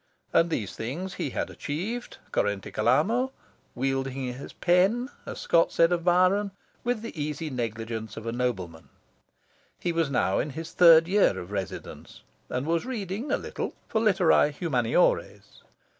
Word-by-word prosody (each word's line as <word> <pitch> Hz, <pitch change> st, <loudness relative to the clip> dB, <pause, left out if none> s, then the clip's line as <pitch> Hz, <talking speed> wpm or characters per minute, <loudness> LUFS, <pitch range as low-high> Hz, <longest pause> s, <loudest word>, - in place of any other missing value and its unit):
And 165 Hz, -, +4 dB
these 110 Hz, -, -3 dB
things 160 Hz, +12 st, -4 dB
he -, -, -3 dB
had -, -, -3 dB
achieved 210 Hz, +12 st, -4 dB
currente 100 Hz, -1 st, -1 dB
calamo, 220 Hz, -, +2 dB, 0.5 s
"wielding 135 Hz, 0 st, -2 dB
his 130 Hz, -, -9 dB
pen," 195 Hz, +9 st, +2 dB, 0.2 s
as -, -, -6 dB
Scott 165 Hz, -1 st, +3 dB
said 165 Hz, +1 st, +4 dB
of 175 Hz, -1 st, 0 dB
Byron, 185 Hz, +3 st, +3 dB, 0.3 s
"with 240 Hz, -2 st, -1 dB
the 230 Hz, -, -7 dB
easy 150 Hz, +1 st, -3 dB
negligence 115 Hz, -2 st, -4 dB
of 110 Hz, -, -7 dB
a 115 Hz, -, -2 dB
nobleman." 95 Hz, -10 st, -3 dB, 0.9 s
He 175 Hz, -, -1 dB
was 165 Hz, -3 st, 0 dB
now 100 Hz, -7 st, +1 dB
in 150 Hz, -, -1 dB
his 165 Hz, 0 st, -5 dB
third 165 Hz, -2 st, +7 dB
year 190 Hz, -, +3 dB
of 90 Hz, +1 st, -7 dB
residence, 95 Hz, -3 st, -6 dB, 0.3 s
and 125 Hz, +2 st, -2 dB
was 165 Hz, +1 st, +1 dB
reading, 225 Hz, 0 st, -4 dB
a -, -, +3 dB
little, -, -, -5 dB
for 220 Hz, -, +1 dB
Literae 185 Hz, -8 st, +4 dB
Humaniores. 130 Hz, -8 st, 0 dB
160 Hz, 150 wpm, -27 LUFS, 120-185 Hz, 0.9 s, third